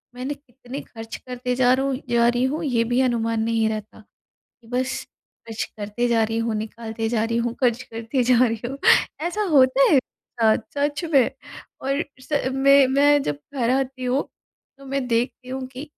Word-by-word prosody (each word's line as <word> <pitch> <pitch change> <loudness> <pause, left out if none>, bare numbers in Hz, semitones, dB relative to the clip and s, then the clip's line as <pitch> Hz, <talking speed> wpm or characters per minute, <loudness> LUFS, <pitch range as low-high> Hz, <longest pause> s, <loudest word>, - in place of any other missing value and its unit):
मैंने 260 +3 -3
कितने 270 -1 -10
खर्च 225 -1 -9
करते 250 0 -4
जा 250 0 +4
रहा 265 +1 +1
हूँ 270 -2 -1
जा 235 0 +4
रही 245 +1 +2
हूँ 300 +5 -2
ये 235 -4 +2
भी 245 +2 0
अनुमान 230 -3 0
नहीं 225 -1 +1
रहता। 215 0 -6
कि - - -33 0.4
बस 255 +2 -2 0.4
खर्च 225 -1 -3
करते 210 +4 -2
जा 230 -2 +3
रही 225 +1 -2
हूँ 230 -1 -1
निकालते 225 +1 -4
जा 225 -2 +1
रही 230 +1 -1
हूँ, 235 0 -1
खर्च 245 -1 +2
करते 230 +3 -2
जा 245 0 +4
रही 230 0 -3
हूँ। 270 +2 -6 0.5
ऐसा 415 +5 -3
होता 265 -1 +5
है। 280 - +6 0.4
हाँ, 220 -1 +5 0.2
सच 290 +4 0
में। 265 -4 +5 0.5
और 275 +3 0 0.2
स 280 -1 -1
मैं 275 +1 +6
मैं 285 +2 +4
जब 145 -1 -2 0.2
घर 245 -4 0
आती 265 -1 -1
हूँ 260 +3 +1 0.5
तो 275 - -14
मैं 275 -1 -2
देखती 245 +2 -1
हूँ 260 0 -4
कि 260 +1 -8
250 Hz, 190 wpm, -23 LUFS, 230-270 Hz, 0.5 s, है